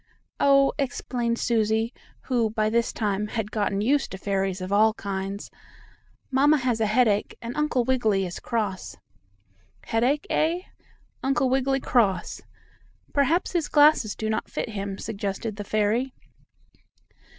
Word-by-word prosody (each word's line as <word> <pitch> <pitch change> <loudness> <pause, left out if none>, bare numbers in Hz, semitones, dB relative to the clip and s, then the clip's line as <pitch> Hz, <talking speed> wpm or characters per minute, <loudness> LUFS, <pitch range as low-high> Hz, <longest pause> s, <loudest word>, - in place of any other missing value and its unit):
"Oh," 275 -1 +4
explained 245 -3 -1
Susie, 225 0 +1 0.3
who, 240 -4 0
by 215 0 0
this 235 0 +1
time, 210 -1 -1
had 215 -1 -4
gotten 205 -2 0
used 270 +6 +1
to 190 - -7
fairies 195 -1 -1
of 185 +1 -5
all 215 +2 +4
kinds, 195 0 -5 0.8
"Mamma 285 +3 +4
has 245 -4 -1
a 220 - +3
headache, 215 -2 +2
and 235 +1 -6
Uncle 300 -5 +1
Wiggily 220 -7 +1
is 175 - -6
cross." 210 -5 -3 0.9
"Headache, 250 +6 +1
eh? 330 +3 +1 0.6
Uncle 265 -1 +1
Wiggily 270 0 +1
cross. 210 -7 +1 0.7
Perhaps 290 +5 +2
his 340 -4 0
glasses 290 -8 +4
do 220 - -3
not 220 - -2
fit - - -3
him," 200 -2 -4
suggested 205 0 -4
the 205 - -4
fairy. 215 +6 0
225 Hz, 135 wpm, -25 LUFS, 205-260 Hz, 0.9 s, Oh